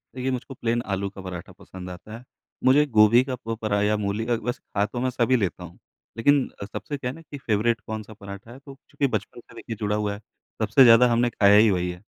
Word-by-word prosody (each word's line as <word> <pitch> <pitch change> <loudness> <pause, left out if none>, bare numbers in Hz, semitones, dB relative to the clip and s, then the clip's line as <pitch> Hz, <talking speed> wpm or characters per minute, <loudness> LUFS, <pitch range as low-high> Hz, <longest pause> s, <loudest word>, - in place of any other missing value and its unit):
देखिए, 130 +1 -2
मुझको 130 +2 -5
प्लेन 120 -1 -1
आलू 100 +1 -2
का 95 0 -11
पराठा 90 -2 -8
पसंद 90 -1 -10
आता 100 +5 -9
है। 120 - -14 0.4
मुझे 135 +3 +5
गोभी 115 -1 +5
का 130 -1 -4
प 115 - -1
परा 105 -2 0
या 105 +1 +2
मूली 105 +2 -2
का 120 - 0
वैसे 120 +3 -3
खा 100 0 +2
तो 115 +4 -6
मैं 130 - +1
सभी 125 0 +1
लेता 95 -6 -2
हूँ, 85 0 -11 0.4
लेकिन 140 +4 +3 0.2
सबसे 105 +7 -6
क्या 125 -2 -4
है 130 - -6
ना 165 - -12
कि 145 -2 -10
फ़ेवरेट 115 -2 0
कौन-सा 110 0 -6
पराठा 100 +1 -10
है, 130 - -12
तो 140 0 -12 0.2
चूँकि 140 - 0
बचपन 110 -1 -4
से - - -17
देखिए 115 - -7
जुड़ा 105 -1 -1
हुआ 105 -1 -1
है, 100 - -8 0.4
सबसे 110 +5 +5
ज़्यादा 120 0 +7
हमने 120 +1 +2
खाया 100 -3 +4
ही 110 +1 +6
वही 90 -1 -1
है, 90 0 -11
110 Hz, 240 wpm, -24 LUFS, 100-125 Hz, 0.4 s, ज़्यादा